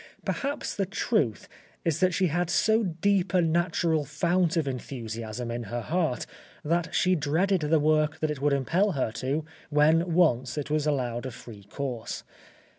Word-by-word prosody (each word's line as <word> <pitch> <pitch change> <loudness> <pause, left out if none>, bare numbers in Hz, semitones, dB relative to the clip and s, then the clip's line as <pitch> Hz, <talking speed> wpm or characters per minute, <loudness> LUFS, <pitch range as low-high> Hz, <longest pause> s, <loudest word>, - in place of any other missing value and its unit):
Perhaps 285 +1 -2
the 195 -2 0
truth 195 - 0 0.4
is 165 -2 +1
that 185 0 +3
she 185 +2 +1
had 175 +1 0
so 220 +5 +3
deep 190 0 0
a 180 - +5
natural 165 -1 +1
fount 170 +4 +1
of 155 -4 +1
enthusiasm 115 -3 -5
in 120 0 -4
her 120 +4 -4
heart 160 -2 -1 0.4
that 170 +2 0
she 185 0 +3
dreaded 175 +4 +1
the 155 +1 +3
work 155 +1 +2
that 155 -1 0
it 145 -3 -5
would 145 0 +2
impel 170 +9 +2
her 130 -6 -1
to, 135 +7 -2 0.2
when 160 +3 +3
once 130 -8 +2
it 145 0 -3
was 155 0 +1
allowed 125 -4 -1
a - - -4
free 110 -4 -12
course. 125 +1 -5
155 Hz, 170 wpm, -27 LUFS, 130-175 Hz, 0.4 s, a